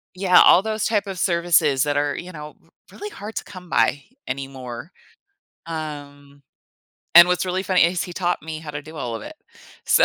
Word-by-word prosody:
Yeah, 185 -1 +5
all 180 - +7
those 215 +1 -2
type 210 -2 0
of 190 - -5
services 170 -6 +2
that 145 -1 -1
are, 145 0 0
you 180 - -7
know, 150 -2 -10
r - - -29 0.2
really 415 - -8
hard 215 - -9
to - - -3
come 180 -3 -12
by 140 -3 +1 0.2
anymore. 135 +1 -7 0.7
Um, 145 -3 -8 0.8
and 175 0 +11
what's 180 0 +1
really 185 +1 -2
funny 185 -3 +3
is 175 +1 0
he 175 - -8
taught 175 -2 -2
me 160 0 -6
how 155 - -8
to 145 0 -6
do 155 +2 -12
all 120 -5 -4
of 110 - -9
it. - - -9 0.5
So - - +5
165 Hz, 195 wpm, -22 LUFS, 145-185 Hz, 0.8 s, and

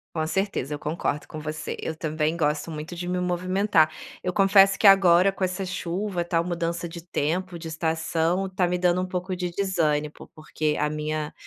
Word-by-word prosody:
Com 160 -1 0
certeza, 190 -6 -1
eu 145 - -4
concordo 150 -1 -2
com 155 - -7
você. 155 0 -4
Eu 160 - -4
também 155 0 -1
gosto 150 +1 0
muito 155 +3 -6
de 175 +1 -5
me 180 0 -1
movimentar. 180 -1 +2 0.3
Eu 180 - 0
confesso 195 0 +5
que 210 - +6
agora, 190 -1 +6
com 195 0 -4
essa 185 +1 -1
chuva, 185 +1 -3
tal, 170 -1 +1
mudança 170 -1 -2
de 170 0 -8
tempo, 175 +2 -2
de 165 - -7
estação, 165 +3 0
tá 185 -1 0
me 180 0 0
dando 180 0 +2
um - - -1
pouco 185 0 -3
de 180 -1 -3
desânimo, 160 -6 0 0.2
porque 155 -1 -2
a 150 - +1
minha 155 0 -3
170 Hz, 190 wpm, -25 LUFS, 155-185 Hz, 0.3 s, que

